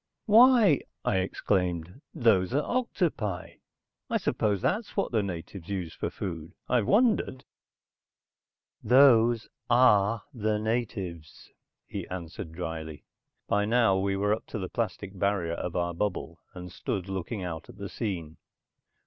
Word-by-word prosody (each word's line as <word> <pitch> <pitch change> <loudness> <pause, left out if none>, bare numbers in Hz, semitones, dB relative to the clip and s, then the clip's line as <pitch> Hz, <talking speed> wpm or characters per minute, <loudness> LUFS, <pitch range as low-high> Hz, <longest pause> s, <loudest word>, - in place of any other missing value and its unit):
"Why," 225 - +6 0.2
I 95 - +2
exclaimed. 90 - -1
"Those 115 - +2
are 145 - +2
octopi. 160 - -2 0.5
I - - +2
suppose 105 -2 0
that's 210 +1 -1
what 195 - 0
the 110 -3 +2
natives 90 -1 -6
use 90 -5 -3
for - - -3
food? 85 -4 -6
I've 120 -5 +2
wondered." 215 - +2 1.4
"Those 120 -2 +5 0.2
are 115 -3 +4
the 110 -3 0
natives," 100 - -4 0.3
he - - -6
answered, 85 -3 -7
drily. 80 -3 -6 0.4
By 105 0 +2
now 115 -3 +3
we 100 0 0
were 105 +2 +1
up 110 - -5
to - - -5
the 95 -3 -4
plastic 100 -4 -4
barrier 100 -4 0
of 85 0 -4
our 85 -1 0
bubble 85 -3 -3 0.2
and 90 -1 -8
stood 95 +1 -4
looking 95 +2 -4
out 80 -3 -6
at - - -13
the 100 0 -5
scene. 85 -8 -4
100 Hz, 135 wpm, -28 LUFS, 90-120 Hz, 1.4 s, Why